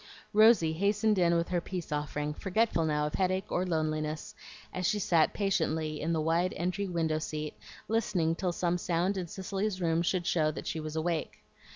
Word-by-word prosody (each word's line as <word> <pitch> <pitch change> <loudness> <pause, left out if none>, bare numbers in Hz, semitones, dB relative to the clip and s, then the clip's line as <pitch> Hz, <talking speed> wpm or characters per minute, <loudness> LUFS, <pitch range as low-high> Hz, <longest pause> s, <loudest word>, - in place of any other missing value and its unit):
Rosy 215 -7 +6
hastened 205 +3 +2
in 170 -1 +4
with 170 - -1
her 175 -1 0
peace 180 -3 -6
offering, 150 0 -2
forgetful 190 -1 +1
now 150 -1 +1
of 150 - -3
headache 190 +1 0
or 185 +1 0
loneliness 155 -2 -2 0.4
as 185 -1 -1
she 210 - +1
sat 170 -5 +3
patiently 160 -6 -1
in 165 - -1
the 165 - +1
wide 165 +4 +1
entry 180 +3 -1
window 165 -3 0
seat 155 -1 -4 0.3
listening 185 -7 +1
till 180 +1 -1
some 175 0 0
sound 175 +3 0
in 185 -2 -3
Cicely's 195 +2 -3
room 165 -1 +1
should 175 0 0
show 155 -3 +2
that 155 - -6
she 160 - -3
was 155 0 -5
awake. 160 0 -2
170 Hz, 185 wpm, -30 LUFS, 155-190 Hz, 0.4 s, Rosy